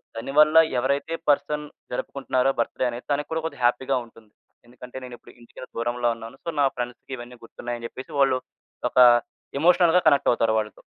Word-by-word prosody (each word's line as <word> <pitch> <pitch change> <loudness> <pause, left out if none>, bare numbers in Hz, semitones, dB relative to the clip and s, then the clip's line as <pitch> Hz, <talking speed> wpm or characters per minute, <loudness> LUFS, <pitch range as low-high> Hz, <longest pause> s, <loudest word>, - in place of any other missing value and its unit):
దానివల్ల 150 +7 +3 0.2
ఎవరైతే 140 +5 -1 0.2
person 150 +1 +1 0.3
జరుపుకుంటున్నారో 130 +1 -1
birthday 120 +2 -1
అనేది 120 +1 -7
తనకి 145 +1 -1
కూడా 160 0 -1
కొద్దిగా 160 -6 -5
హ్యాపీ‌గా 130 +2 +1
ఉంటుంది. 110 -2 -20 0.4
ఎందుకంటే, 125 +1 -11
నేనిప్పుడు 125 -2 -11
ఇంటికి 120 - -14 0.2
దూరంలో 120 +1 0
ఉన్నాను. 115 +2 -10
సో, - - -4
నా 140 - +5
ఫ్రెండ్స్‌కివన్నీ 120 0 -7
గుర్తున్నాయి 120 +1 -6
అని 115 - -5
చెప్పేసి, 130 - -10
వాళ్ళు 135 -2 +3 0.5
ఒక - - -12 0.6
ఎమోషనల్‌గా 175 +2 +4
కనెక్ట్ 140 -2 +4
అవుతారు 115 -2 +1
వాళ్ళతో. 105 -1 -6
125 Hz, 155 wpm, -24 LUFS, 120-140 Hz, 0.6 s, నా